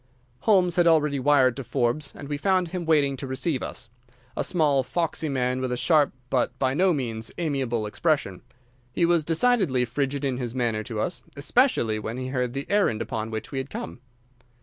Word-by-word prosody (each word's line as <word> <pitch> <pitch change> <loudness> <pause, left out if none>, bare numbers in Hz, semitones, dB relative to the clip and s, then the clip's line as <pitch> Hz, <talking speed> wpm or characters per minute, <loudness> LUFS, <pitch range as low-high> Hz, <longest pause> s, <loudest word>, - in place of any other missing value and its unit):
Holmes 180 0 +3
had 175 -1 +4
already 150 -4 +3
wired 130 -2 +4
to 135 - -4
Forbes, 135 +3 -1
and - - -9
we 145 - -2
found 185 +2 +1
him 180 0 -4
waiting 145 -4 +3
to 135 - -6
receive 130 +2 -1
us—a 125 +2 -8
small, 150 -6 +2
foxy 160 +2 -2
man 130 -1 0
with 130 -1 -2
a 125 - -1
sharp 150 +1 +3 0.2
but 125 0 0
by 130 0 +1
no 185 +5 +3
means 115 -7 -3
amiable 135 -9 -1
expression. 105 - -1 0.5
He 170 - +1
was 170 -2 +3
decidedly 165 - +2
frigid 140 +3 -2
in 130 -2 -1
his 125 -1 -4
manner 115 -4 0
to 110 -2 -4
us, 175 +11 -2 0.2
especially 140 - +2
when 110 +3 -5
he 130 0 -4
heard 125 -2 -1
the 140 +1 -4
errand 200 - +2
upon 110 0 -3
which 110 -1 -5
we 135 - -2
had 130 +1 -5
come. 230 - -6
135 Hz, 190 wpm, -25 LUFS, 125-160 Hz, 0.5 s, had